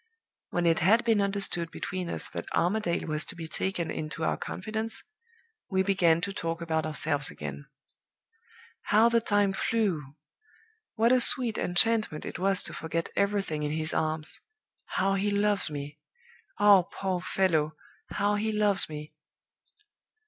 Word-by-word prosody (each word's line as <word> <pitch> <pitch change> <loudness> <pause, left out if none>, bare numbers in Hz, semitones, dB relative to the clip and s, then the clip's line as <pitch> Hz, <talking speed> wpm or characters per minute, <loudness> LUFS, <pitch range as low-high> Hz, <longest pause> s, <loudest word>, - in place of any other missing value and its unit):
"When 175 0 -1
it 165 -1 +3
had 220 +8 +4
been 225 -3 +3
understood 195 -4 -1
between 180 +1 -5
us - - -2
that - - -7
Armadale 175 -1 0
was 155 -1 0
to 205 - -4
be 165 -2 -7
taken 170 0 -2
into 155 +1 -5
our - - +1
confidence, 220 +3 -4 0.7
we 190 -1 +1
began 175 -4 +2
to 195 +3 -3
talk 165 -3 -3
about 160 -2 -1
ourselves 145 -2 +2
again. 70 -1 -8 1.2
How 220 +3 +4
the 235 0 +2
time 205 -2 +1
flew! 180 -11 -1 0.8
What 230 +1 +3
a 255 -1 +5
sweet 245 -2 +5
enchantment 215 -2 +2
it - - -6
was 195 0 +2
to - - -5
forget 165 +1 -3
everything 200 -6 0
in 150 0 -2
his 155 0 -1
arms! 155 0 -1 0.5
How 195 +1 0
he 195 +1 0
loves 205 -2 +2
me! 145 0 -7 0.6
ah, 205 -2 +6
poor 185 0 -4
fellow, 160 -5 0 0.3
how 205 +1 0
he 220 +1 -1
loves 210 -4 +2
me! 150 0 -8
185 Hz, 150 wpm, -28 LUFS, 160-205 Hz, 1.2 s, ah